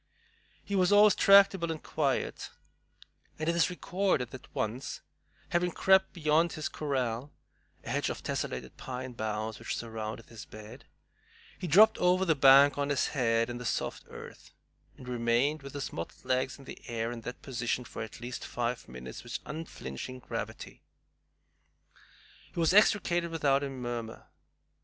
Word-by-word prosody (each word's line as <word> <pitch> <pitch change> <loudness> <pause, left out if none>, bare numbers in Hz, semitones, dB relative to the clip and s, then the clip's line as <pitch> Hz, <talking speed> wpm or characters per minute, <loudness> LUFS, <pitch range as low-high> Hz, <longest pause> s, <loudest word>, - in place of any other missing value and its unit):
He 200 - -2
was 185 -1 +3
always 205 0 +7
tractable 195 -3 +6
and 160 -1 -4
quiet, 140 -4 -1 0.9
and 155 - -3
it 170 - +2
is 170 -1 +3
recorded 180 -8 -1
that 130 - -11
once, 115 +5 -3 0.5
having 175 +1 +1
crept 190 +2 +3
beyond 160 0 +2
his 155 - -3
"corral," 130 -2 -2 0.5
a - - -8
hedge - - 0
of - - -5
tessellated 65 - -4
pine 130 0 -6
boughs, 110 -1 -3
which - - -3
surrounded 110 -1 -5
his 115 -2 -10
bed, 110 +5 -12 0.7
he 180 - -4
dropped 215 +8 +6
over 180 +1 +3
the 165 - +4
bank 140 0 +7
on 140 0 0
his 145 -2 +1
head 115 -4 +1
in 120 0 -5
the - - -6
soft 120 - -2
earth, - - -11 0.5
and 125 - -12
remained 125 +5 +1
with 140 -1 -9
his 140 - -4
mottled 85 - -7
legs 130 +1 0
in 135 - -14
the - - -10
air 115 0 -2
in 120 -1 -6
that 125 +2 -8
position 125 -1 -2
for - - -7
at 110 -1 -7
least 120 +1 -6
five 120 0 -3
minutes 65 0 -8
with - - -4
unflinching 130 - -6
gravity. 125 - -6 1.7
He - - -3
was 165 +1 +3
extricated 180 -5 +4
without 145 -4 +2
a 140 - -3
murmur. 120 -3 -5
135 Hz, 155 wpm, -30 LUFS, 120-165 Hz, 1.7 s, always